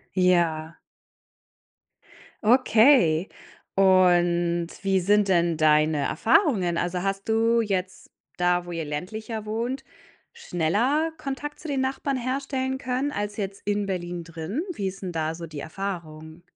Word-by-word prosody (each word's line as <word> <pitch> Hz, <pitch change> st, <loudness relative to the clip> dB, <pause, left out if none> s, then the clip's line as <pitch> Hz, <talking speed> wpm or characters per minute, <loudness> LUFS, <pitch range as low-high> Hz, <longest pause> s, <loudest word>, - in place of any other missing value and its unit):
Ja. 170 Hz, -3 st, +2 dB, 1.7 s
Okay, 220 Hz, -, +5 dB, 0.5 s
und 175 Hz, -3 st, +3 dB
wie 195 Hz, -1 st, +1 dB
sind 205 Hz, +2 st, +3 dB
denn 170 Hz, -3 st, +2 dB
deine 155 Hz, 0 st, +3 dB
Erfahrungen? 225 Hz, -, +2 dB
Also, 175 Hz, +1 st, -1 dB
hast 195 Hz, +2 st, -3 dB
du 230 Hz, +1 st, +3 dB
jetzt 190 Hz, -4 st, -3 dB, 0.3 s
da, 180 Hz, 0 st, +2 dB
wo 175 Hz, -, -8 dB
ihr 165 Hz, -2 st, -4 dB
ländlicher 215 Hz, +9 st, -5 dB
wohnt, 235 Hz, +5 st, -3 dB, 0.5 s
schneller 265 Hz, -, 0 dB
Kontakt 285 Hz, +1 st, -5 dB
zu 320 Hz, -, -8 dB
den 275 Hz, -2 st, 0 dB
Nachbarn 270 Hz, +1 st, -1 dB
herstellen 265 Hz, +1 st, -2 dB
können 260 Hz, +3 st, -2 dB
als 205 Hz, -3 st, -3 dB
jetzt 195 Hz, -1 st, -4 dB
in 205 Hz, 0 st, 0 dB
Berlin 175 Hz, -2 st, -4 dB
drin? 165 Hz, -, -4 dB
Wie 205 Hz, -, -4 dB
ist 190 Hz, +1 st, -5 dB
'n 180 Hz, -2 st, -4 dB
da 160 Hz, 0 st, -2 dB
so 170 Hz, 0 st, -7 dB
die 155 Hz, -2 st, -8 dB
Erfahrung? 160 Hz, -3 st, -6 dB
195 Hz, 130 wpm, -25 LUFS, 170-235 Hz, 1.7 s, Okay